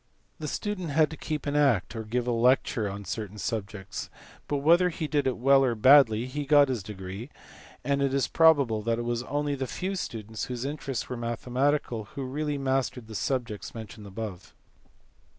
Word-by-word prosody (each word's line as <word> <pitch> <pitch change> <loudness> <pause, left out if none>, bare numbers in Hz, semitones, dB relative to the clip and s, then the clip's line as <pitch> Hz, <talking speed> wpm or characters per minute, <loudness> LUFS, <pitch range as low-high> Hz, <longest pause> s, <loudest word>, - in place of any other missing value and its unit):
The 155 - -4
student 185 +1 -3
had 155 +2 +3
to - - -5
keep 150 -2 -4
an 145 0 -1
act 135 -10 +2
or 110 - -4
give 120 +3 -2
a 125 - 0
lecture 120 -2 +2
on 100 +1 -7
certain 105 +2 -5
subjects, 100 -2 -4 0.4
but 145 - 0
whether 170 +6 +4
he 160 -2 -4
did 145 -3 +1
it 130 - 0
well 135 +2 +5
or 125 -3 +1
badly 120 -1 +6
he 145 +3 -4
got 145 -1 +6
his 125 -5 -1
degree, 95 +4 -7 0.5
and 140 0 +1
it 140 -1 +2
is 135 -1 +1
probable 140 -9 +4
that 115 +1 0
it 120 - -2
was 120 0 -1
only 145 +3 -1
the 135 -2 -3
few 185 +9 -3
students 110 - -5
whose 125 0 -4
interests 140 -3 -3
were 125 - -5
mathematical 120 +1 -1
who 140 - -3
really 145 +3 -2
mastered 130 -3 -1
the 110 - -10
subjects 120 -2 -3
mentioned 110 -2 -9
above. 100 -2 -7
130 Hz, 185 wpm, -28 LUFS, 110-145 Hz, 0.5 s, badly